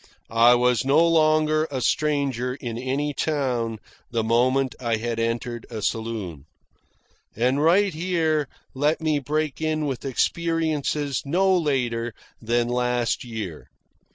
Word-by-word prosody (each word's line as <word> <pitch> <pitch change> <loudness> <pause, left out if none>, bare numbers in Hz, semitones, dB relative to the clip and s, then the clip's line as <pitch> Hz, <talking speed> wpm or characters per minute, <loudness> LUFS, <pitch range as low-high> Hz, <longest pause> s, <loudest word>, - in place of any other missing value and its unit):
I 120 +2 +6
was 125 -1 +2
no 150 +5 +4
longer 155 -1 +3
a 135 -2 -3
stranger 135 -2 0
in 120 -4 -6
any 135 +4 -2
town 125 -8 -1 0.3
the 115 -3 -1
moment 125 +3 +2
I 115 -3 0
had 115 +1 -3
entered 115 +1 -2
a 110 -3 -6
saloon. 105 -11 -3 0.9
And 125 +5 +1
right 190 +4 +4
here 160 -3 0 0.3
let 145 +4 +1
me 155 -2 +1
break 150 +2 -2
in 155 -1 0
with 135 -4 -3
experiences 150 -1 0
no 185 +6 +2
later 120 -8 -1 0.3
than 120 +1 +1
last 125 -1 0
year. 110 -10 -6
130 Hz, 125 wpm, -24 LUFS, 120-155 Hz, 0.9 s, I